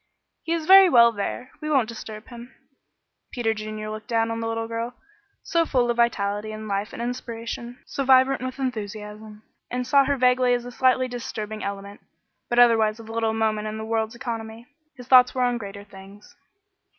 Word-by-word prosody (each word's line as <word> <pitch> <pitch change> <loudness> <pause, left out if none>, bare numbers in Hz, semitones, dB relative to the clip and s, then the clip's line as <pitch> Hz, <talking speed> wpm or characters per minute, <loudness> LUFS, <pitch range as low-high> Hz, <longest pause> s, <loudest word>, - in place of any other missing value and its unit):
"He 330 - -2
is 330 -2 -2
very 385 +1 +8
well 235 -5 +6
there; 230 +4 -5
we 305 - -4
won't 270 -7 +2
disturb 215 -1 -9
him." 240 +1 -11 0.8
Peter 230 -3 0
Junior 215 0 -6
looked 215 0 -8
down 230 -2 0
on 225 - -3
the 225 - -3
little 225 0 -3
girl, 230 +2 -4 0.5
so 335 -2 +1
full 250 -6 +1
of 240 - -4
vitality 210 -2 0
and 215 0 -7
life 200 +1 -2
and - - -9
inspiration, 235 0 -6
so 275 - -3
vibrant 260 0 +4
with 255 0 -5
enthusiasm, 215 -3 -6 0.3
and 250 0 -3
saw 275 +2 +4
her 280 +1 0
vaguely 250 0 +3
as 245 0 -4
a 245 - -7
slightly 255 +1 +2
disturbing 220 -3 -6
element, 200 0 -6 0.5
but 240 - -1
otherwise 225 -2 +4
of 225 -1 -11
little 225 -1 -1
moment 215 -1 0
in 215 0 -5
the 220 - -5
world's 225 0 -2
economy. 230 -2 -6 0.3
His 250 -1 -11
thoughts 255 -1 +6
were 255 - +1
on 245 -1 0
greater 200 -1 -8
things. 200 +1 -15
230 Hz, 185 wpm, -24 LUFS, 215-250 Hz, 0.8 s, very